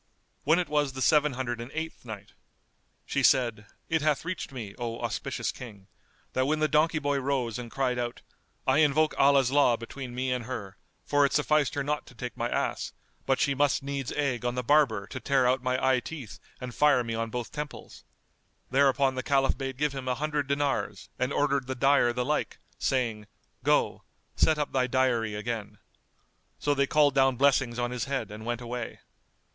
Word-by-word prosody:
When 160 Hz, +4 st, +5 dB
it 180 Hz, -, 0 dB
was 145 Hz, -2 st, 0 dB
the 130 Hz, -, -7 dB
Seven 150 Hz, -2 st, +4 dB
Hundred 120 Hz, -2 st, -3 dB
and 120 Hz, -, -7 dB
Eighth 160 Hz, -4 st, -5 dB
Night, 105 Hz, -3 st, -9 dB, 0.7 s
She 140 Hz, -, -1 dB
said, 120 Hz, -6 st, +3 dB, 0.2 s
It 160 Hz, -1 st, +1 dB
hath 150 Hz, 0 st, +1 dB
reached 175 Hz, -4 st, -4 dB
me, 115 Hz, -7 st, -7 dB
O 115 Hz, -1 st, -3 dB
auspicious 115 Hz, -6 st, -2 dB
King, 105 Hz, -6 st, -11 dB, 0.5 s
that 130 Hz, +1 st, +1 dB
when 155 Hz, +2 st, +1 dB
the 155 Hz, 0 st, +2 dB
donkey 155 Hz, +2 st, +3 dB
boy 145 Hz, -1 st, 0 dB
rose 130 Hz, -4 st, -1 dB
and 120 Hz, -1 st, -7 dB
cried 125 Hz, -1 st, -1 dB
out, 120 Hz, -1 st, -4 dB, 0.4 s
"I 135 Hz, +3 st, +3 dB
invoke 155 Hz, +1 st, +3 dB
Allah's 135 Hz, -2 st, +5 dB
law 135 Hz, -4 st, +4 dB
between 120 Hz, +1 st, -8 dB
me 130 Hz, +1 st, -1 dB
and 125 Hz, -2 st, -2 dB
her; 100 Hz, -6 st, -6 dB, 0.3 s
for 145 Hz, 0 st, +3 dB
it 140 Hz, -, +2 dB
sufficed 150 Hz, -1 st, +2 dB
her 140 Hz, -, 0 dB
not 150 Hz, +1 st, -2 dB
to 125 Hz, -, -15 dB
take 125 Hz, +2 st, -6 dB
my 120 Hz, +1 st, -2 dB
ass, -, -, -2 dB, 0.3 s
but 135 Hz, -, +2 dB
she 140 Hz, -2 st, +2 dB
must 140 Hz, 0 st, +1 dB
needs 140 Hz, -1 st, -3 dB
egg 140 Hz, -5 st, -1 dB
on 120 Hz, 0 st, -1 dB
the 125 Hz, -, -2 dB
barber 130 Hz, -8 st, +3 dB
to 130 Hz, -, -7 dB
tear 135 Hz, -1 st, +2 dB
out 130 Hz, +1 st, +2 dB
my 130 Hz, 0 st, 0 dB
eye 130 Hz, -1 st, +4 dB
teeth 130 Hz, -3 st, -8 dB, 0.2 s
and 125 Hz, -1 st, -6 dB
fire 145 Hz, -3 st, +4 dB
me 115 Hz, -1 st, -4 dB
on 115 Hz, 0 st, -2 dB
both 120 Hz, 0 st, -4 dB
temples;" 150 Hz, -1 st, -7 dB, 0.7 s
thereupon 135 Hz, 0 st, +3 dB
the 130 Hz, -, -3 dB
Caliph 135 Hz, 0 st, +2 dB
bade 135 Hz, -2 st, -5 dB
give 150 Hz, 0 st, 0 dB
him 135 Hz, -1 st, -6 dB
an 125 Hz, -, +1 dB
hundred 150 Hz, -1 st, -1 dB
dinars 140 Hz, -7 st, -1 dB
and 125 Hz, +1 st, 0 dB
ordered 140 Hz, -3 st, +1 dB
the 130 Hz, -, -3 dB
dyer 135 Hz, -1 st, +4 dB
the 125 Hz, +1 st, -2 dB
like, 150 Hz, +2 st, -1 dB, 0.2 s
saying, 115 Hz, -6 st, -1 dB, 0.4 s
"Go; -, -, +2 dB, 0.3 s
set 155 Hz, -, +3 dB
up 150 Hz, -, -2 dB
thy 130 Hz, -1 st, +2 dB
dyery 120 Hz, -4 st, +1 dB
again." 105 Hz, -1 st, -4 dB, 0.8 s
So 145 Hz, -, +1 dB
they 140 Hz, -1 st, +1 dB
called 145 Hz, -1 st, +4 dB
down 135 Hz, -1 st, +4 dB
blessings 135 Hz, -2 st, +2 dB
on 120 Hz, 0 st, -1 dB
his 125 Hz, -1 st, -2 dB
head 135 Hz, -5 st, -3 dB
and 110 Hz, +2 st, -8 dB
went 120 Hz, 0 st, -2 dB
away. 120 Hz, -1 st, -5 dB
130 Hz, 195 wpm, -28 LUFS, 120-145 Hz, 0.8 s, When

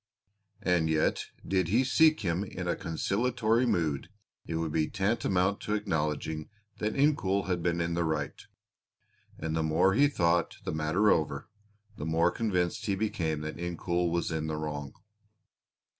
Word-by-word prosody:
And 85 Hz, -3 st, +2 dB
yet 80 Hz, 0 st, +1 dB, 0.2 s
did 95 Hz, -3 st, +1 dB
he 115 Hz, +9 st, +3 dB
seek 155 Hz, +4 st, +4 dB
him 90 Hz, -1 st, 0 dB
in 90 Hz, -3 st, -6 dB
a 85 Hz, -, +1 dB
conciliatory 115 Hz, +7 st, 0 dB
mood 80 Hz, -, 0 dB, 0.4 s
it 80 Hz, -, -3 dB
would 80 Hz, -1 st, -1 dB
be 80 Hz, 0 st, +1 dB
tantamount 95 Hz, -1 st, +1 dB
to 105 Hz, -, -1 dB
acknowledging 80 Hz, -4 st, -2 dB, 0.3 s
that 105 Hz, 0 st, -1 dB
Incoul 120 Hz, -9 st, +2 dB
had 90 Hz, -2 st, -1 dB
been 85 Hz, 0 st, 0 dB
in 85 Hz, 0 st, -1 dB
the 85 Hz, 0 st, +1 dB
right, 80 Hz, -3 st, -2 dB, 0.9 s
and 80 Hz, 0 st, -3 dB
the 80 Hz, -, +1 dB
more 80 Hz, +4 st, +3 dB
he 140 Hz, +7 st, +5 dB
thought 85 Hz, -10 st, +1 dB
the -, -, -3 dB
matter 80 Hz, +7 st, +2 dB
over 75 Hz, -3 st, 0 dB, 0.5 s
the 75 Hz, -, -4 dB
more 85 Hz, +2 st, +3 dB
convinced 95 Hz, 0 st, -1 dB
he 100 Hz, -, +1 dB
became 85 Hz, -7 st, -1 dB
that 75 Hz, 0 st, -5 dB
Incoul 85 Hz, 0 st, -1 dB
was 85 Hz, 0 st, -1 dB
in 80 Hz, -1 st, -2 dB
the 80 Hz, -1 st, -2 dB
wrong. 75 Hz, -2 st, -5 dB
85 Hz, 160 wpm, -29 LUFS, 80-100 Hz, 0.9 s, he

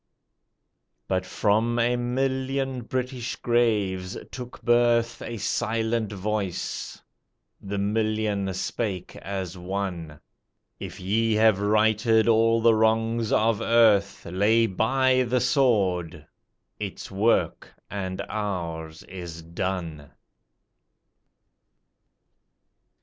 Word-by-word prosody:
But 95 Hz, 0 st, -1 dB
from 110 Hz, +4 st, +1 dB
a 120 Hz, +1 st, +2 dB
million 130 Hz, +1 st, -1 dB
British 125 Hz, 0 st, -3 dB
graves 105 Hz, -6 st, 0 dB
took 125 Hz, -1 st, -8 dB
birth 120 Hz, -1 st, +2 dB
A 115 Hz, -, -5 dB
silent 115 Hz, 0 st, -1 dB
voice 100 Hz, -2 st, -3 dB, 0.6 s
the 100 Hz, +1 st, -4 dB
million 105 Hz, -1 st, 0 dB
spake 95 Hz, -1 st, -3 dB
as 95 Hz, -2 st, -5 dB
one 90 Hz, -5 st, -4 dB, 0.6 s
"If -, -, -7 dB
ye 110 Hz, +4 st, +1 dB
have 110 Hz, -2 st, +4 dB
righted 110 Hz, +2 st, +3 dB
all 115 Hz, 0 st, +4 dB
the 115 Hz, 0 st, +5 dB
wrongs 110 Hz, +1 st, +1 dB
of 110 Hz, -1 st, +2 dB
earth 110 Hz, -4 st, +3 dB
Lay 105 Hz, +6 st, +3 dB
by 130 Hz, +6 st, +2 dB
the 125 Hz, 0 st, +1 dB
sword! 95 Hz, -, +1 dB, 0.5 s
Its 100 Hz, -1 st, -6 dB
work 105 Hz, +4 st, +1 dB, 0.2 s
and 95 Hz, -2 st, -4 dB
ours 85 Hz, -6 st, -4 dB
is 85 Hz, -3 st, -8 dB
done." 85 Hz, -3 st, -4 dB
110 Hz, 90 wpm, -25 LUFS, 95-115 Hz, 0.6 s, the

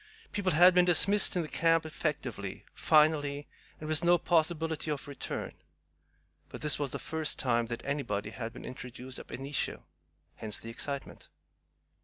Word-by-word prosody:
People 190 Hz, -3 st, 0 dB
had 180 Hz, +4 st, +7 dB
been 180 Hz, 0 st, +6 dB
dismissed 195 Hz, +4 st, +4 dB
the 170 Hz, -3 st, 0 dB
camp 165 Hz, +1 st, +2 dB
effectively, 135 Hz, -, -4 dB
finally, 150 Hz, -2 st, +3 dB, 0.3 s
and 155 Hz, -, -6 dB
with 155 Hz, +1 st, +2 dB
no 175 Hz, +1 st, +6 dB
possibility 160 Hz, -2 st, 0 dB
of 145 Hz, -2 st, -3 dB
return; 140 Hz, -, -5 dB, 1.0 s
but -, -, -9 dB
this 150 Hz, -1 st, +1 dB
was 145 Hz, -2 st, -1 dB
the -, -, -4 dB
first 160 Hz, -1 st, -2 dB
time 120 Hz, -3 st, +1 dB
that 120 Hz, 0 st, -6 dB
anybody 110 Hz, -8 st, -2 dB
had 115 Hz, 0 st, -5 dB
been -, -, -10 dB
introduced 125 Hz, 0 st, -7 dB
AB -, -, -8 dB
INITIO. 135 Hz, +3 st, -3 dB, 0.5 s
Hence 110 Hz, -2 st, -3 dB
the 115 Hz, -, -8 dB
excitement. 140 Hz, +3 st, -5 dB
150 Hz, 150 wpm, -31 LUFS, 125-165 Hz, 1.0 s, had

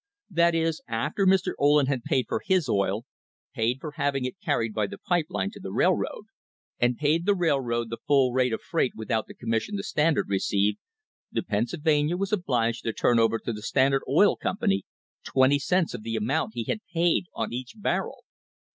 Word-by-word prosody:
That 170 Hz, -1 st, +3 dB
is, 165 Hz, -1 st, 0 dB
after 145 Hz, -, 0 dB
Mr. 190 Hz, -1 st, +3 dB
Ohlen 145 Hz, 0 st, +4 dB
had 130 Hz, -2 st, -1 dB
paid 130 Hz, +1 st, +1 dB
for -, -, -2 dB
his 185 Hz, -6 st, +2 dB
oil, 100 Hz, +1 st, 0 dB, 0.5 s
paid 115 Hz, +3 st, 0 dB
for 155 Hz, +2 st, -6 dB
having 135 Hz, -2 st, 0 dB
it 130 Hz, +9 st, -5 dB
carried 115 Hz, -, 0 dB
by 105 Hz, -2 st, 0 dB
the 100 Hz, -, -8 dB
pipe 175 Hz, -, 0 dB
line 95 Hz, +1 st, -2 dB
to -, -, -12 dB
the -, -, -7 dB
railroad, -, -, +1 dB, 0.6 s
and 120 Hz, 0 st, +2 dB
paid 155 Hz, +4 st, +1 dB
the 205 Hz, -, +4 dB
rail! 165 Hz, -6 st, +2 dB
road 120 Hz, -2 st, -2 dB
the 115 Hz, -, -5 dB
full 135 Hz, -3 st, +4 dB
rate 130 Hz, -1 st, +2 dB
of 110 Hz, -, -3 dB
freight 165 Hz, -7 st, 0 dB
without 110 Hz, 0 st, -2 dB
the -, -, -12 dB
commission 115 Hz, -, -2 dB
the 200 Hz, -, -3 dB
Stand 160 Hz, -5 st, +1 dB
ard -, -, 0 dB
received, 100 Hz, +1 st, +1 dB, 0.5 s
the -, -, -1 dB
Pennsylvania 150 Hz, -, 0 dB
was 195 Hz, +2 st, -2 dB
obliged 120 Hz, -, 0 dB
to 115 Hz, -, -1 dB
turn 120 Hz, +1 st, +2 dB
over 115 Hz, 0 st, +3 dB
to 120 Hz, -, -1 dB
the 105 Hz, -, -7 dB
Standard 135 Hz, +4 st, +2 dB
Oil -, -, +5 dB
Company 95 Hz, 0 st, -1 dB, 0.4 s
twenty 135 Hz, +2 st, +3 dB
cents 180 Hz, +3 st, +1 dB
of -, -, -6 dB
the 115 Hz, +1 st, -4 dB
amount 115 Hz, +3 st, -1 dB
he 120 Hz, -, -2 dB
had 210 Hz, -, -2 dB
| -, -, -37 dB
paid 170 Hz, +2 st, +2 dB
on 115 Hz, 0 st, -3 dB
each 125 Hz, 0 st, -5 dB
barrel! 210 Hz, -, -2 dB
130 Hz, 200 wpm, -26 LUFS, 115-165 Hz, 0.6 s, Oil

